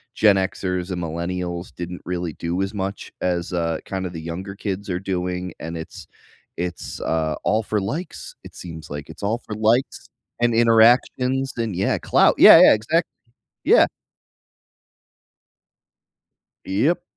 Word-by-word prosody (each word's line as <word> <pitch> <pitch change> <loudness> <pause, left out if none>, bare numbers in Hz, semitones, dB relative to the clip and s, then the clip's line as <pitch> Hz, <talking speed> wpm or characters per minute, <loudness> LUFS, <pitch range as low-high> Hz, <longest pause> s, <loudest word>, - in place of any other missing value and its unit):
Gen 105 -2 +5
Xers 95 -1 -2
and 90 -1 -3
millennials 85 +1 -4
didn't 90 0 -6
really 90 -2 -3
do 85 +5 -3
as 95 +1 -2
much 100 -1 -5
as, 90 -1 -1
uh, 85 -2 -1
kinda 95 -1 -4
the 85 -2 -7
younger 90 +5 -6
kids 100 0 -5
are 90 -1 -1
doing, 90 -1 -3
and 85 +1 -6
it's 80 - -9 0.5
it's, 90 -1 -5
uh, 80 -1 -1
all 110 +1 +1
for 105 -1 -1
likes, 145 - -5
it - - -12
seems, 80 -3 -9
like, 75 +1 -7
it's 80 - -11
all 110 +4 0
for 105 - -6
likes 110 +4 0 0.3
and 120 0 +2
interactions, 120 +3 +3
and 115 -5 -2
yeah, 95 +3 +1
clout, - - +3
yeah, - - +10
yeah, - - +8
exactly, 155 +11 0 0.5
yeah. - - +6 2.8
Yep. 135 - 0
95 Hz, 145 wpm, -22 LUFS, 85-110 Hz, 2.8 s, yeah